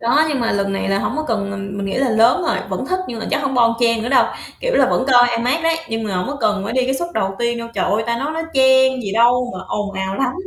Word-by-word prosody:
Đó, 265 +7 +3
nhưng 285 -4 -1
mà 230 - 0
lần 200 0 -1
này 195 - -2
là 195 0 +1
hổng 240 - -2
có 310 - -1
cần 205 -3 -1
ừm, 195 0 -6
mình 200 0 -3
nghĩ 195 - -3
là 265 -2 +1
lớn 230 +9 +3
rồi, - - 0
vẫn - - -4
thích 370 0 -1
nhưng 235 - -5
mà - - -5
chắc 295 - 0
hổng 275 -1 -1
bon 235 -2 +4
chen 230 -2 +2
nữa 235 - -3
đâu, 265 - +4 0.4
kiểu - - -1
là - - +4
vẫn - - +1
coi 245 0 +6
IMAX 250 +8 0
đấy, 330 0 +2
nhưng 225 -1 -3
mà 200 -3 -3
hổng 180 - -2
có 290 - -4
cần 210 -3 0
phải 220 - -4
đi 255 0 +1
cái 265 +1 0
suất 345 +6 -3
đầu 195 0 -1
tiên 235 0 -1
đâu. 230 0 -6
Trời 195 - 0
ơi, 210 +3 0
ta 235 0 -1
nói 285 +5 -3
nó 325 +1 -3
chen 260 -1 +4
gì 200 -3 -4
đâu 245 +3 +3
mà - - -6
ồn 205 -1 -3
ào 190 0 -3
lắm. 260 -2 0
235 Hz, 315 wpm, -19 LUFS, 205-265 Hz, 0.4 s, coi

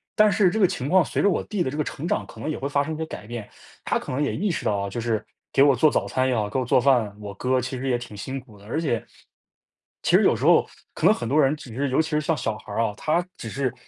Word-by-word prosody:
但 215 0 +6
是 195 -2 +4
这 220 - -2
个 190 - +6
情 135 -2 -4
况 185 -2 +5
随 - - -1
着 205 - +4
我 - - 0
弟 205 -4 -3
的 150 - +1
这 145 - -5
个 150 - +1
成 155 +3 -5
长， - - 0
可 - - -13
能 155 - -3
也 155 - -2
会 140 - -3
发 145 0 +1
生 155 +2 -4
一 - - -7
些 160 - -3
改 110 - -9
变， 120 -3 -6 0.4
他 - - +1
可 - - -7
能 130 +3 -1
也 145 - 0
意 200 +4 0
识 170 - -3
到 105 - +2
啊， 100 0 -2
就 120 - -5
是 115 -2 -1 0.3
给 135 - +4
我 140 -1 +6
做 150 +5 +4
早 - - 0
餐 130 0 +1
也 125 - +1
好， 105 -2 -1
给 - - -3
我 130 - -1
做 125 - +3
饭， 120 -7 +2
我 100 -1 -6
哥 130 +2 +1
其 130 +1 -4
实 135 +2 -4
也 125 - +2
挺 105 -4 -9
辛 130 +7 -5
苦 110 -5 -18
的， 100 - -16
而 150 +10 -2
且， 120 -8 0 1.0
其 - - +3
实 - - +3
有 - - +4
时 - - -5
候， - - +5 0.3
可 - - -2
能 - - +7
很 120 - -4
多 150 +4 +3
人 140 +2 +3
只 125 -6 -11
是 140 +2 0
尤 130 +4 +3
其 160 - -4
是 150 - +1
像 155 +1 0
小 110 -6 -2
孩 100 - -10
儿 115 - 0
啊， 110 -2 -1
他 170 +7 0
只 115 - -6
是 135 -1 -2
135 Hz, 345 characters per minute, -24 LUFS, 115-155 Hz, 1.0 s, 能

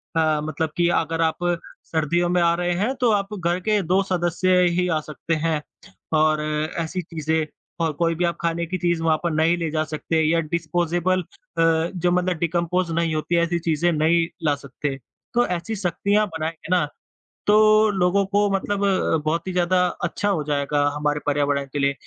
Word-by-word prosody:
अ, 155 -2 +2
मतलब 155 +1 -2
कि 175 -1 +3
अगर 165 -1 0
आप 160 -1 +1 0.5
सर्दियों 170 +2 0
में 180 0 +2
आ 170 0 +4
रहे 175 0 -1
हैं, 210 +9 0
तो 250 -3 +2
आप 200 0 0
घर 175 +1 0
के 210 +2 +1
2 185 +2 +2
सदस्य 180 0 +1 0.2
ही 180 - +1
आ 160 -3 +1
सकते 155 +2 -3
हैं, 155 -1 -1 0.5
और 155 0 +3 0.4
ऐसी 170 +3 -2
चीज़ें, 160 -2 -2 0.3
और 165 -1 +1
कोई 165 +2 0
भी 175 - -1
आप 170 - 0
खाने 170 0 -1
की 185 +3 -3
चीज़ 170 -2 0
वहाँ 160 -1 +3
पर 170 - 0
नहीं 160 +2 +2
ले 165 -2 -2
जा 155 -1 0
सकते, 155 +1 -1
या 165 +2 +2
डिस्पोज़ेबल 170 +3 0
अ, - - -12 0.7
जो 175 0 +1
मतलब 180 -1 +1
डिकम्पोज़ 170 +1 0
नहीं 165 -1 0
होती 155 +3 -1
हैं, 170 - +3
ऐसी 170 0 0
चीज़ें 165 +3 +2
नहीं 165 +1 +2 0.2
ला 150 -2 +2
सकते। 140 0 -5 0.4
तो 240 0 +3
ऐसी 180 +5 -3
सख्तियाँ 200 +2 +1
बनाएँगे 160 -1 -5
ना, 165 -5 +2 0.6
तो 215 +1 +5
लोगों 195 0 +2
को 205 +1 +2
मतलब 200 +1 -1
अ, 190 -4 +2
बहुत 165 +4 -1
ही 185 - -3
ज़्यादा 180 0 +2 0.2
अच्छा 185 +4 -1
हो 185 -7 +1
जाएगा 145 0 0
हमारे 150 0 0
पर्यावरण 145 -1 +1
के 145 - -2
लिए, 140 0 +2
170 Hz, 190 wpm, -23 LUFS, 155-180 Hz, 0.7 s, तो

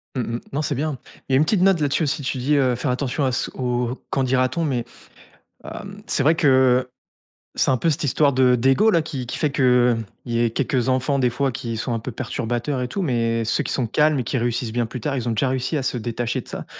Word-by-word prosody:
Mmh 130 - 0 0.2
mh. - - -8
Non 145 - 0
c'est 145 -1 -1
bien. 145 +1 -2 0.3
Il - - 0
y - - +6
a - - +6
une 145 - +5
petite 190 +2 +1
note 190 -2 +4
là-dessus 145 +3 +1
aussi. 145 0 -1
Tu 130 - -2
dis, 135 +4 +1
heu, 130 -3 +2
faire 125 +3 -1
attention 130 +3 -1
à 130 - +1
ce 120 - -2
au 125 0 -2
qu'en 135 - 0
dira-t-on 130 +4 +1
mais 125 -6 -1 0.8
hem, - - -8
c'est - - 0
vrai 155 +4 +4
que 130 -5 +3 0.7
c'est - - +2
un 130 - +4
peu 165 - +1
cette 150 -1 -1
histoire 140 +2 +3
de 125 -1 +4
d'ego, 135 - +3
là, 170 - +3
qui 140 -5 -5
qui - - -4
fait 150 -3 0
qu'il 125 -3 +3 0.3
y 120 -2 -1
ait 120 -1 +2
quelques 130 0 0
enfants 130 +2 +1
des 125 -2 +3
fois 135 +3 -1
qui 115 -1 -5
sont 120 +2 -2
un 115 - -1
peu 125 - -6
perturbateurs 120 +2 -3
et 125 - -2
tout 195 - -3
mais 115 -6 0
ceux 110 0 0
qui - - -3
sont 125 -4 0
calmes 150 +3 +2
et 125 - -1
qui 130 - -2
réussissent 120 0 -1
bien 120 +1 0
plus 115 +1 -7
tard, 140 -2 -2
ils 125 - -3
ont 115 - +1
déjà 120 +4 +1
réussi 130 +2 -1
à 140 - -2
se 130 - -1
détacher 120 +1 -2
de - - -20
ça. - - -6
130 Hz, 260 wpm, -22 LUFS, 120-140 Hz, 0.8 s, y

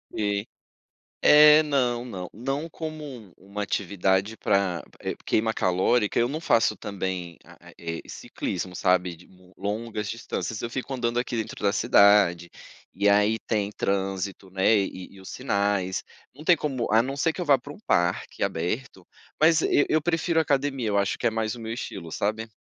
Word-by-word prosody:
Sim. 105 0 -1 0.8
É, 150 +1 +8
não, 125 -4 0
não. 90 -7 -6
Não 135 +8 -4
como 155 -1 -6
um 120 - -10
uma 100 +2 -6
atividade 100 +2 0
para, 95 -4 0 0.2
eh, - - -3
queima 110 +1 +1
calórica, 100 +5 +1
eu 120 - +3
não 150 +4 -4
faço 115 -9 +2
também, 95 -4 -4
a - - -17
a - - -12
eh, 85 -1 -5
ciclismo 90 -1 -5
sabe, 90 -2 +1
de 85 - -18 0.3
longas 105 +1 -3
distâncias, 110 -2 -4
eu 120 - -3
fico 135 +2 -4
andando 120 -1 -1
aqui 120 -1 -3
dentro 110 -2 -4
da 100 - +3
cidade, 100 -6 +4 0.4
e 100 +1 +2
aí 105 +2 +3
tem 105 -2 -2
trânsito, 95 -1 -3
né, 95 +4 +3
e 95 -2 -3
e, - - -14
os 95 - -10
sinais, 100 -2 -1 0.3
não 150 +4 -12
tem 175 +1 +5
como 135 -6 -2
a 110 - +6
não 135 +3 -4
ser 165 +2 +1
que 180 - -5
eu - - -2
vá 140 -2 +5
para 145 +4 -10
um - - -15
parque 85 +1 0
aberto, 95 +3 -3 0.4
mas 160 0 +5
eu 145 - +3
eu 155 0 +3
prefiro 165 -1 +1
academia, 140 -5 0
eu 100 - +1
acho 100 -1 0
que - - -5
é 115 - +3
mais 110 +1 -2
o - - -10
meu 115 0 -5
estilo, 90 -8 -6
sabe. 110 +2 -2
110 Hz, 180 wpm, -26 LUFS, 95-130 Hz, 0.8 s, É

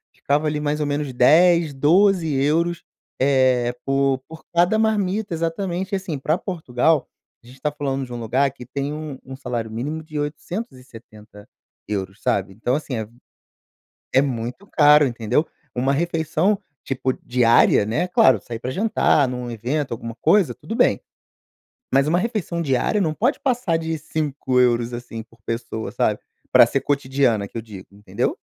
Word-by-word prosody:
Ficava, 150 +2 0
ali, 150 0 -1
mais 150 0 -1
ou 150 - 0
menos 145 -1 -2
10, 160 +5 +5
12 170 +4 +3
euros, 160 +5 +1 0.4
eh, 130 -3 +3
por 135 -1 +1
por 160 0 -12
cada 175 +6 +3
marmita. 210 -2 0
Exatamente, 175 +4 -3
e - - +4
assim, 190 -6 -3
pra 155 +5 0
Portugal, 160 -5 0 0.4
a - - -19
gente 130 +2 -15
tá 150 - 0
falando 135 -2 -3
de 125 - -10
um 120 - -5
lugar 130 +5 +1
que 125 -2 -12
tem 140 +3 -4
um 150 -3 -6
um 130 - -9
salário 120 -4 -4
mínimo 140 +8 -4
de 155 -1 -8
870 125 - -7 0.4
euros, 100 -1 -4
sabe? 95 0 0
Então, 115 +5 -2
assim, 145 -3 -4
é 110 -1 -4 1.1
é 135 - +5
muito 125 - -3
caro, 150 -4 +5
entendeu? 120 +5 0 0.3
Uma 130 +2 +1
refeição, 165 +5 0 0.3
tipo 130 0 -1
diária, 120 -4 +4
né, 150 +12 -1
claro, 130 - +4
sair 115 +3 -7
pra 125 +3 -4
jantar 170 -7 +2
num 125 -1 -5
evento, 125 +6 -2
alguma 115 0 -5
coisa, 200 -5 +3
tudo 225 - -7
bem. - - +3 0.9
Mas 135 +1 +4
uma 170 +3 +3
refeição 190 -6 -2
diária, 140 +8 +1
não 160 -5 +1
pode 230 - 0
passar 245 -10 0
de 160 0 -3
5 145 -4 -1
euros, 120 -1 +2
assim, 120 -2 -6
por 115 +1 -23
pessoa, 115 -1 -4
sabe? - - +1 0.3
Pra - - +8
ser 135 - -1
cotidiana, 135 -6 +1
que - - -13
eu - - -5
digo, 100 -4 -11
entendeu? 100 -1 -3
140 Hz, 165 wpm, -22 LUFS, 120-165 Hz, 1.1 s, Pra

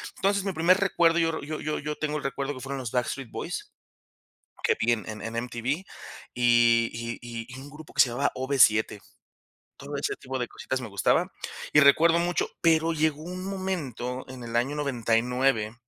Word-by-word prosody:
Entonces, 200 0 +1
mi 195 -2 -2
primer 175 +3 +4
recuerdo, 170 -4 +3
yo 165 -1 +1
yo 155 +1 -4
yo 155 0 -2
yo 150 +1 -4
tengo 150 0 -2
el - - -6
recuerdo 135 +1 -2
que 130 - -9
fueron 135 +1 -4
los 120 -4 -5
Backstreet 125 0 -2
Boys, - - -5 0.9
que - - +2
vi 120 +1 +3
en 110 -3 -2
en 110 -1 -6
en 115 +1 -5
MTV, 120 -1 -7 0.7
y 120 -1 +4
y 115 0 -5
y 115 -1 -7
y 130 - -9
un 140 - -10
grupo 150 +2 -12
que - - +2
se 125 - +6
llamaba 135 +4 0
OB7. 120 -6 +3 0.8
Todo 140 +1 -6
ese 140 - -1
tipo 130 -1 -5
de 120 - -1
cositas 130 0 -4
me 110 - -6
gustaban. 100 -2 +2 0.4
Y 150 - +7
recuerdo 160 +4 +6
mucho 175 +1 0
pero 165 0 +3
llegó 155 -1 0
un 180 +2 -6
momento, 160 - -4
en 130 -2 -9
el 115 0 -3
año 135 +5 0
99, 120 -3 +1
135 Hz, 190 wpm, -27 LUFS, 120-155 Hz, 0.9 s, Y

